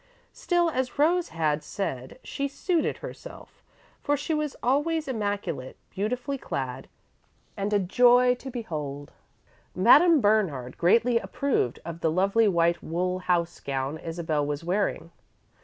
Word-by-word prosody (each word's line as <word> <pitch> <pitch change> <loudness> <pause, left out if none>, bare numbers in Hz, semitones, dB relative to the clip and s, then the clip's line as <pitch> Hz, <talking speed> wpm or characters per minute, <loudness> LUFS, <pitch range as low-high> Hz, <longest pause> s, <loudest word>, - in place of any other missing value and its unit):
Still, 345 -2 +1
as 260 -2 -2
Rose 340 +4 +2
had 155 -2 -1
said, 130 - -5
she 280 0 -3
"suited 330 +4 -1
herself," - - -11 0.4
for 290 0 +1
she 295 +3 -3
was 300 -2 -2
always 295 +5 +1
immaculate, 205 - -3
beautifully 250 +7 -3
clad, 130 - -4 0.7
and 200 +1 -2
a 205 - +4
joy 245 +6 +4
to 255 +2 -8
behold. 150 - -5 0.6
Madame 295 - +6
Bernard 190 - +1
greatly 230 +7 +4
approved 240 - -1
of 170 0 -6
the 165 - +1
lovely 195 +6 +2
white 170 -2 +2
wool 180 +3 -2
house 175 -2 0
gown 135 +2 -3
Isabel 165 -2 -2
was 145 +1 -3
wearing. 175 -2 -1
200 Hz, 130 wpm, -26 LUFS, 160-260 Hz, 0.7 s, Madame